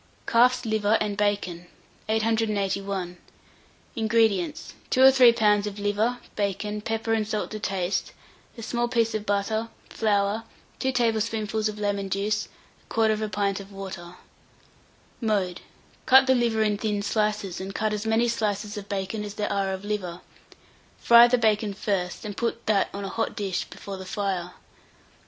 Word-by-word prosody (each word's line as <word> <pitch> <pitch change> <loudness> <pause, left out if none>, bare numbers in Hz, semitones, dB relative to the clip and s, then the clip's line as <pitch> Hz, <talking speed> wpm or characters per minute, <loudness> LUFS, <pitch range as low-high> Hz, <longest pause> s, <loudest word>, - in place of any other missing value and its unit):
CALF'S 250 +1 +3
LIVER 220 -1 +2
AND 210 -1 -1
BACON. 200 -4 -1 0.4
881. 200 -4 -1 0.8
INGREDIENTS. 220 -7 +1 0.2
2 - - 0
or 265 - +10
3 255 -3 +7
lbs. 210 -2 +2
of 205 0 -6
liver, 205 +4 0 0.2
bacon, 210 +1 -2
pepper 225 +1 -1
and 215 -2 0
salt 215 -1 -3
to 215 - -5
taste, 190 -2 -2 0.5
a 230 - -7
small 240 +1 -1
piece 230 -2 +1
of 215 -1 -3
butter, 220 +3 0 0.2
flour, 205 0 +1 0.4
2 265 - 0
tablespoonfuls 220 -3 0
of 210 - -7
lemon 200 -1 -2
juice, 210 +2 -1 0.4
1/4 215 -1 +1
pint 200 0 0
of 200 0 -11
water. 190 -3 -8 1.1
Mode. 200 -6 0 0.5
Cut 265 +1 +8
the 260 - +4
liver 235 -3 +2
in 210 -1 0
thin 205 -2 -1
slices, 210 -3 -1
and 195 +1 -6
cut 215 0 0
as 210 0 -2
many 225 +2 +2
slices 210 -2 -2
of 200 - -12
bacon 200 +2 -3
as 205 0 -7
there 210 -1 -2
are 195 -1 0
of 190 +1 -5
liver; 185 -4 -3 0.8
fry 235 0 +7
the 250 +1 +3
bacon 215 -3 +1
first, 195 -2 -2
and 205 -1 -5
put 235 +1 -2
that 210 -2 +2
on 200 0 -5
a - - -3
hot 225 +4 -2
dish 195 -3 -2
before 195 -1 -8
the 190 - -8
fire. 185 -4 -2
210 Hz, 155 wpm, -26 LUFS, 200-225 Hz, 1.1 s, or